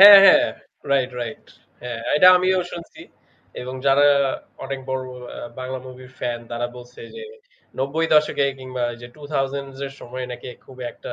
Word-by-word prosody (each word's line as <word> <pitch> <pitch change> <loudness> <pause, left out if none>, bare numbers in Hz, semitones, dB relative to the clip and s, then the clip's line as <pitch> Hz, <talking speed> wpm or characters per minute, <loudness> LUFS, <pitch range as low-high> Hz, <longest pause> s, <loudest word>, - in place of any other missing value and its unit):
হ্যাঁ 200 0 +13
,হ্যাঁ, 295 +7 +8 0.5
right, 130 -2 +2
right. 120 -2 -6 0.4
হ্যাঁ, 120 -2 -5 0.2
এটা 165 - +7
আমিও 185 +1 +2
শুনছি। 170 -1 -9 0.6
এবং 130 +1 -6
যারা 140 +1 +6 0.6
অনেক 135 0 -4
বড়, 130 0 -1
বড় 125 0 -10
আ - - -7 0.2
বাংলা 130 0 -4
মুভির 130 0 -12
ফ্যান 120 -1 -2
তারা 120 +1 -1
বলছে 125 0 -12 0.2
যে 460 - -7 0.6
৯০ 150 +2 +2
এ - - +3
কিংবা 130 -1 -5
এইযে 120 +1 -11
২০০০ 140 -2 -2 0.2
এর 135 - -8
সময় 125 +1 -6
নাকি 125 +1 -8 0.2
খুব 130 - -14
একটা - - -9
130 Hz, 160 wpm, -22 LUFS, 125-150 Hz, 0.6 s, হ্যাঁ